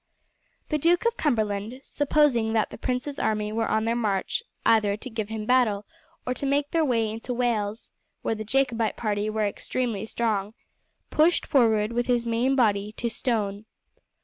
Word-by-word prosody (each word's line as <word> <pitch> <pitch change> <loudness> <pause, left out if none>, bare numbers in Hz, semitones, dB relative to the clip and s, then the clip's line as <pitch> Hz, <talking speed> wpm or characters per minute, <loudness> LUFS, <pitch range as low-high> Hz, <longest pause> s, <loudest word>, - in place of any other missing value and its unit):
The 305 - 0
Duke 345 +7 +3
of 470 0 +2
Cumberland, 220 - -1
supposing 280 -7 +2
that 220 -2 +1
the - - -8
prince's 260 +4 -2
army 215 -1 0
were 225 0 0
on 220 0 +1
their 230 +1 +1
march 210 - 0 0.2
either 210 -3 +3
to 255 - -7
give 220 -2 -3
him 220 -1 -4
battle 220 -5 +2 0.4
or 250 - 0
to 280 - -4
make 285 +1 +1
their 330 -1 +2
way 235 -6 +1
into 225 +3 -4
Wales, 225 -3 -1 0.3
where - - 0
the 215 0 -5
Jacobite 230 -2 0
party 210 -1 -1
were 215 0 0
extremely 220 0 -3
strong, 215 -2 -1 0.6
pushed 320 +3 +3
forward 225 -5 +3
with 240 0 0
his 240 -1 +1
main 235 +4 +1
body 210 -5 +2
to 235 +1 -2
Stone. 210 -4 -2
230 Hz, 170 wpm, -26 LUFS, 215-255 Hz, 0.6 s, Duke